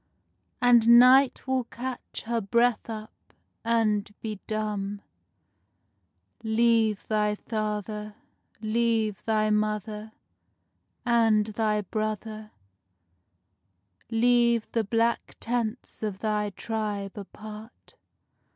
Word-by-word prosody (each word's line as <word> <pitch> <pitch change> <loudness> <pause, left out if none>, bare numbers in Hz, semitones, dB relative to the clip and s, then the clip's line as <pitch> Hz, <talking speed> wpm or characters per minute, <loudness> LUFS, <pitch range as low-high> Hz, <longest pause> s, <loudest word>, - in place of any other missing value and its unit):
And 235 -1 +7
night 255 +2 +6
will 260 -2 0
catch 250 +2 -6
her 230 0 -1
breath 235 +3 +1
up, 215 -1 -9 0.3
and 215 -3 +1
be 215 -3 -5
dumb. 205 -2 -3 1.4
Leave 220 -1 +2
thy 210 -1 +1
father, 210 -1 -4 0.5
leave 220 -2 0
thy 215 -1 +2
mother 210 0 -2 0.9
And 225 -3 +3
thy 215 0 0
brother; 215 +1 -4 1.6
Leave 235 0 +3
the 230 - +1
black 230 +2 0
tents 235 0 -3
of 210 -3 -3
thy 210 0 -1
tribe 205 -1 -4
apart! 215 +2 -11
220 Hz, 85 wpm, -27 LUFS, 210-235 Hz, 1.6 s, And